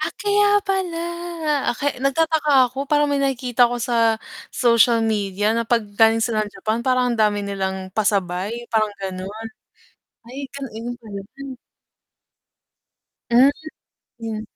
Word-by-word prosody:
Ah, 315 +2 -2
kaya 410 0 +3 0.2
pala! 380 -3 -1 0.7
Ah, - - +1
kay 285 -3 -2
nagtataka 290 -2 +3
ako 270 +3 -5
parang 295 0 +2
may 280 - +1
nakikita 250 -3 +2
ko 245 - -2
sa 230 -1 +2 0.3
social 235 -1 +3
media 205 -1 0
na 230 - +1
'pag 235 -2 +2
galing 225 0 +5
sila 220 -2 0
ng 205 - -12
Japan 220 +1 -2
parang 255 -1 +1
ang 235 - -4
dami 210 -1 +2
nilang 190 -1 -4
pasabay, 200 +2 -1
parang 215 -2 +2
ganon, 195 +4 -6 0.8
ay 275 +3 -6
ganu 275 -1 -6
iyon 240 +2 -5
pala. 205 -4 -8 2.1
Hmm, 250 +3 +6 0.7
hmm. 220 -1 -4
235 Hz, 135 wpm, -21 LUFS, 215-270 Hz, 2.1 s, Hmm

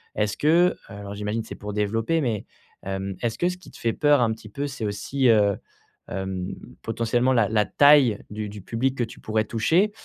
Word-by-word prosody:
Est-ce 105 -1 0
que 170 +4 +4
alors, 100 0 -8
j'imagine, 105 +2 -2
c'est 115 - -8
pour 105 0 -7
développer, 115 +9 0
mais, 115 -6 -1 0.4
hem, 95 0 -4
est-ce 115 -1 -1
que 175 - +2
ce 180 - -5
qui 185 - -15
te - - -14
fait 115 -1 0
peur 145 -3 +4
un 115 -1 +3
petit 110 -1 -11
peu, 140 +7 -4
c'est 135 -5 -5
aussi, 105 +6 0
heu, 105 -3 +4 0.5
hem, 95 -1 -4 0.3
potentiellement 120 +3 +1
la 115 -4 +3
la 105 -1 +2
taille 140 -7 +5
du 105 0 -4
du 105 0 -9
public 130 +5 -1
que 120 - +1
tu 110 - -13
pourrais 110 0 0
toucher? 165 - +2
115 Hz, 205 wpm, -24 LUFS, 105-135 Hz, 0.5 s, taille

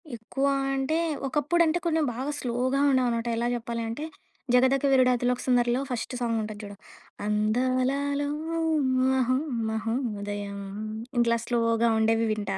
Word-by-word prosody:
ఎక్కువ 235 +5 -3 0.3
అంటే 270 +4 0 0.3
ఒకప్పుడు 300 +5 +1
అంటే 325 +2 +1
కొంచెం 320 -2 +2
బాగా 265 +4 -3
స్లో‌గా 255 +2 0
ఉండేవనమాట. 245 -3 +1
ఎలా 235 +1 0
చెప్పాలి 235 0 -4
అంటే 245 +7 -5 0.5
'జగదక 260 +2 +4
వీరుడు 255 -1 +5
అతిలోక 245 +1 0
సుందరిలో' 245 0 +2
ఫస్ట్ 245 0 -3
సాంగ్ 230 -1 0
ఉంటది 215 -1 -6
జూడు. 205 0 -8 0.5
అందాలలో 255 +7 0 0.8
మహొ 255 -1 +2 0.3
మహొ 220 +1 -2 0.3
దయం 205 -1 -4 0.6
ఇట్లా 235 0 +3
స్లోగా 230 -1 +2
ఉండేవి 225 +1 +2
వింటా. 205 -2 -2
245 Hz, 130 wpm, -27 LUFS, 225-265 Hz, 0.8 s, వీరుడు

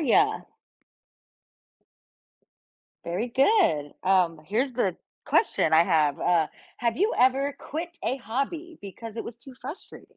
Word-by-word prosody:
ya? 415 - +3 2.6
Very 185 +8 -2
good, 260 - +3
um, 180 -4 +2
here's 245 - 0
the 195 -8 0 0.3
question 160 - +2
I 165 +1 +6
have, 155 -5 +2
uh, 170 -3 +2 0.3
have 235 -2 0
you 420 +6 +2
ever 270 +3 +3
quit 330 +4 -5
a 255 - 0
hobby 275 - -4
because 220 +3 -9
it - - -3
was 235 - -8
too 265 +3 -13
frustrating? 280 +8 -10
235 Hz, 125 wpm, -26 LUFS, 180-280 Hz, 2.6 s, I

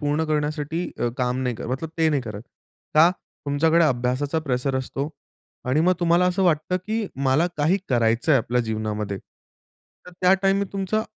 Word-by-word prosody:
पूर्ण 145 +1 0
करण्यासाठी 155 +2 -2
अ, 120 - +1
काम 125 0 0
नाही 125 -2 -1
करत, - - -6
मतलब 135 +5 -3
ते 160 -1 +4
नाही 145 -4 +1
करत. 105 -3 -7 0.5
का? 160 +3 +7 0.4
तुमच्याकडे 160 +4 +3
अभ्यासाचा 130 +2 0
प्रेशर 135 -2 -1
असतो 135 +2 -3 0.6
आणि 145 +5 +3
मग 180 +2 +4
तुम्हाला 175 +1 +3
असं 180 +2 +1
वाटतं, 175 0 +2
की 215 +4 -3 0.2
मला 145 +6 +3
काही 155 +6 +2
करायचंय 120 +4 +3
आपल्या 125 0 0
जीवनामध्ये. 110 -3 -3 0.9
तर - - -10
त्या 180 0 +5
टाईममध्ये 195 0 +1
तुमचा 200 +2 -1
150 Hz, 160 wpm, -23 LUFS, 125-170 Hz, 0.9 s, का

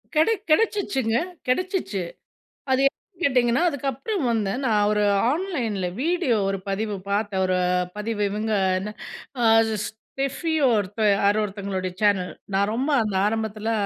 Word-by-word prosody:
கிடை 320 +9 +4 0.2
கிடைச்சுச்சுங்க 310 - +2 0.3
கிடைச்சிச்சு. 350 - -1 0.7
அது 260 0 +3
எப்டின்னு 355 +4 -18
கேட்டிங்கன்னா 250 +1 +3
அதுக்கப்புறம் 285 - -2
வந்து 205 -4 0
நான் 210 -3 +3
ஒரு 210 0 +1 0.3
ஆன்லைன்ல 260 - -1 0.2
வீடியோ 335 -8 +1
ஒரு 195 0 -1
பதிவு 205 +1 -2
பாத்தேன். 200 -2 0
ஒரு 185 0 +1 0.4
பதிவு 210 0 -2
இவங்க 215 +2 -2 0.3
என்ன 210 +3 -5 0.5
அ - - +4 0.7
Steffi 275 +5 -1 0.2
ஒருத் 205 0 -1 0.2
யார 200 0 +3
ஒருத்தவங்களுடைய 195 -2 -3
சேனல் 200 -3 +2 0.2
நான் 200 +2 +2
ரொம்ப 270 +5 -1
அந்த 210 -2 -3
ஆரம்பத்தில 220 0 -2
220 Hz, 125 wpm, -24 LUFS, 205-275 Hz, 0.7 s, கிடை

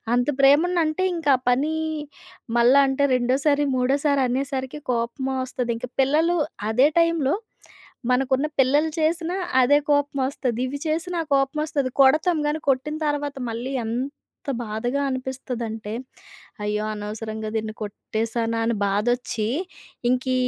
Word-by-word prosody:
అంత 245 0 +1
ప్రేమనంటే, 315 +4 +4
ఇంకా 320 -4 +1
ఆ - - -18
పని 285 +6 +2 0.8
మళ్ళా 250 +4 +6
అంటే 270 +1 0
రెండోసారి, 270 +4 +2
మూడోసారనేసరికి 270 +1 0
కోపమోస్తది. 255 +1 -2
ఇంకా 250 +2 -6
పిల్లలు 315 +6 +2 0.3
అదే 255 +6 +5
టైంలో, 335 -5 +2 0.8
మనకున్న 265 +2 +2
పిల్లలు 290 +4 +4
చేసినా 335 +3 0 0.3
అదే 285 +4 +5
కోపమొస్తది, 275 -4 0
ఇది 280 +2 -5
చేసినా 335 +2 -1
కోపమొస్తది. 280 0 0
కొడతాం 310 +5 +4
గాని, 310 +1 -1
కొట్టిన 275 +4 0
తర్వాత 290 -1 -2 0.2
మళ్ళీ 240 +4 -4
ఎంత 260 +4 -5
బాధగా 240 +5 -2
అనిపిస్తదంటే, 245 -4 -4 0.7
అయ్యో! 210 0 -1
అనవసరంగా 215 +1 -5
దీన్ని 220 0 -2
కొట్టేశానా 225 +2 -2
అని 230 0 +1
బాధొచ్చి, 215 +2 0 0.6
ఇంకీ 255 +1 +1
265 Hz, 110 wpm, -23 LUFS, 240-290 Hz, 0.8 s, మళ్ళా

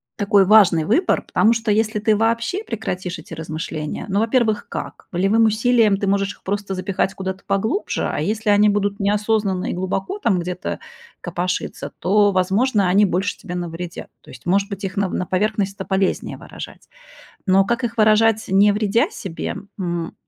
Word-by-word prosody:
такой 200 -2 +3
важный 185 -6 +5
выбор, 335 - +2
потому 225 - +3
что 225 -1 -1
если 220 +1 +1
ты 215 +1 +2
вообще 230 - 0
прекратишь 185 - -4
эти - - -11
размышления, 155 -1 -5
ну, 200 +1 +1
во-первых, 225 -1 +1
как? - - -7
Волевым 195 +6 +3
усилием 220 -1 +3
ты 200 - -2
можешь 200 0 0
их - - -25
просто 200 0 -3
запихать 190 +1 -1
куда-то 190 0 -5
поглубже, 220 - -1
а - - -3
если 215 0 0
они 205 +1 +5
будут 205 0 0
неосознанные 205 -2 0
и - - -2
глубоко 190 - -3
там 200 - +1
где-то 180 +1 -4 0.4
копошиться, 175 +1 -3
то, 205 +2 +3
возможно, 195 +3 +2
они 200 +3 +5
больше 190 +2 -1
тебе 180 - -7
навредят. 175 0 -6
То - - -19
есть, - - -13
может 195 +3 +1
быть, 200 -1 -6
их 195 0 -4
нав 195 -2 0
на 180 - -1
поверхность- 200 +1 0
это 190 - -5
полезнее 190 0 -1
выражать. - - -10 0.6
Но 195 0 +4
как 235 +4 -1
их 230 - -4
выражать, 220 0 +4
не 200 +2 +5
вредя 210 +2 +1
себе? 175 -4 -5 0.2
М, 175 -2 -3
200 Hz, 170 wpm, -21 LUFS, 185-220 Hz, 0.6 s, важный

